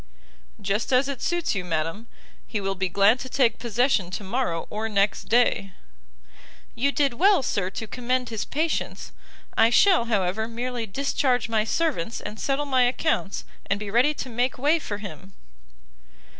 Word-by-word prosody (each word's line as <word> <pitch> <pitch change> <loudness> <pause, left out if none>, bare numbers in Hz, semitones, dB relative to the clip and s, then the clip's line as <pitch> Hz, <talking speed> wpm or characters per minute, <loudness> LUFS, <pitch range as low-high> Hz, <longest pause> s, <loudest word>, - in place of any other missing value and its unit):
"Just 205 +5 -1
as 255 +1 +4
it 280 -3 -5
suits 345 -2 0
you, 195 -3 -2
madam. 165 +6 -3 0.4
He 215 - -2
will 195 -1 -1
be 190 -1 -2
glad 200 +6 +4
to 260 - -6
take 245 -4 +2
possession 235 -4 +1
to 185 +3 -5
morrow 195 -5 -2
or 220 +1 -3
next 200 -1 +1
day." 220 -5 +2 1.0
"You 270 +4 +1
did 280 -3 +1
well, 375 +3 +4
Sir, 195 -6 -1
to 225 - -6
commend 250 +2 -2
his 220 -2 -3
patience! 315 +2 -2 0.4
I 225 +1 +5
shall, 345 +2 +5
however, 215 -1 0
merely 235 0 -4
discharge 255 +1 0
my 220 -1 +1
servants, 235 - -1
and 215 - -7
settle 280 +1 0
my 260 -3 +2
accounts, 245 -5 -1 0.2
and 195 - 0
be 210 -1 -5
ready 255 +7 +3
to - - -5
make 245 +2 -1
way 295 +6 +2
for 205 -9 -5
him." 195 -2 -9
230 Hz, 165 wpm, -25 LUFS, 200-265 Hz, 1.0 s, I